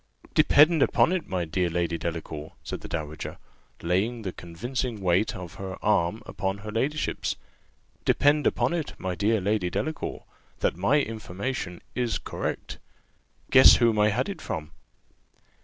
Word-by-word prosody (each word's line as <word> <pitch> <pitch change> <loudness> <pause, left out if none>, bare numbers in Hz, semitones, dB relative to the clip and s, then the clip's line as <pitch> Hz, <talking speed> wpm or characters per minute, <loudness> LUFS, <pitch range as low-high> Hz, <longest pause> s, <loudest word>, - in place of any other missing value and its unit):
"Depend 155 +2 +6
upon 170 - +4
it, 185 -3 -2
my 90 -2 -1
dear 85 +2 0
Lady 85 0 -1
Delacour," 80 -2 -5
said - - -5
the - - -7
dowager, 75 -2 -5 0.5
laying 105 +7 0
the 95 - -3
convincing 120 +7 -4
weight 95 +2 +2
of 90 -2 -7
her 95 -1 -5
arm 105 0 +2
upon 95 0 -3
her 105 +1 -7
ladyship's, 140 +7 -1 0.7
"depend 145 +1 +3
upon - - +1
it, 165 -3 -2
my 95 -1 -3
dear 105 +4 +2
Lady 100 -1 0
Delacour, 155 - -3 0.4
that - - +2
my 100 - +3
information 110 -4 -4
is 120 -2 0
correct. - - -5 0.7
Guess 130 0 +9
whom 115 -3 +3
I 105 0 +5
had 120 - 0
it 200 - -6
from." 75 -1 -5
105 Hz, 145 wpm, -27 LUFS, 90-125 Hz, 0.7 s, Guess